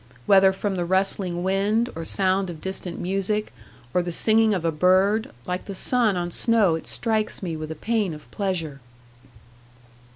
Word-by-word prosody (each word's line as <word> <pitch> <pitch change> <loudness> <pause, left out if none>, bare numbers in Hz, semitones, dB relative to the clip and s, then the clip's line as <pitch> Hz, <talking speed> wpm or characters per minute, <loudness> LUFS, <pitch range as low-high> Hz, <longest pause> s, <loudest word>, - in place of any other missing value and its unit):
Whether 190 -1 +6
from 190 0 -3
the 175 - 0
rustling 190 -1 0
wind, 205 +5 +1
or 165 - -5
sound 190 +1 +1
of 165 -3 -7
distant 190 -1 -5
music, 195 +3 -2 0.4
or 180 - +3
the 175 0 -4
singing 220 +5 +3
of 185 -5 -1
a 165 - +2
bird, 190 +6 +3 0.2
like 180 +1 -3
the 200 - -6
sun 225 -2 +2
on 175 0 -3
snow 220 -3 +3
it 160 - -4
strikes 220 -3 -1
me 170 -3 -3
with 155 0 -6
a 160 - -5
pain 210 -1 -1
of 150 - -15
pleasure. 170 -8 -3
190 Hz, 170 wpm, -24 LUFS, 175-210 Hz, 0.4 s, Whether